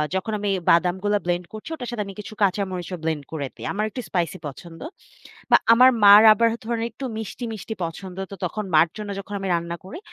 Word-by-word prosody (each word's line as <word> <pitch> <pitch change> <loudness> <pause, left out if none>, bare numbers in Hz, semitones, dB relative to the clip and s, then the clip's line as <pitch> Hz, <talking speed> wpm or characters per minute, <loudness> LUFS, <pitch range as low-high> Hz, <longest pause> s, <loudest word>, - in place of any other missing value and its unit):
যখন 190 +4 -2
আমি 205 0 -2 0.2
বাদামগুলো 185 +4 +3
ব্লেন্ড 175 0 -1
করছি 215 +7 -8
ওটার 250 -6 -6
সাথে 225 -3 -2
আমি 195 - -8
কিছু 210 - -8
কাঁচামরিচও 185 -2 -1
ব্লেন্ড 160 -3 -2
করে 150 -4 -3
দেই, - - -9
আমার 210 +2 -1
একটু 250 - -6
স্পাইসি 175 -3 -1
পছন্দ। 165 +4 -10 0.7
বা - - +9 0.2
আমার 250 +3 +7
মার 205 +1 +10
আবার 230 +2 +3
ধরুন 230 0 -2
একটু 270 - -7
মিষ্টি, 220 +3 -6
মিষ্টি 220 +1 -6
পছন্দ, 180 +3 -6
তো - - -6
তখন 215 +4 -3
মার 155 +2 +6
জন্য 210 -1 -6
যখন 200 +1 -9
আমি 195 - -4
রান্না 170 0 -3
করি 195 - -8
195 Hz, 200 wpm, -23 LUFS, 175-215 Hz, 0.7 s, মার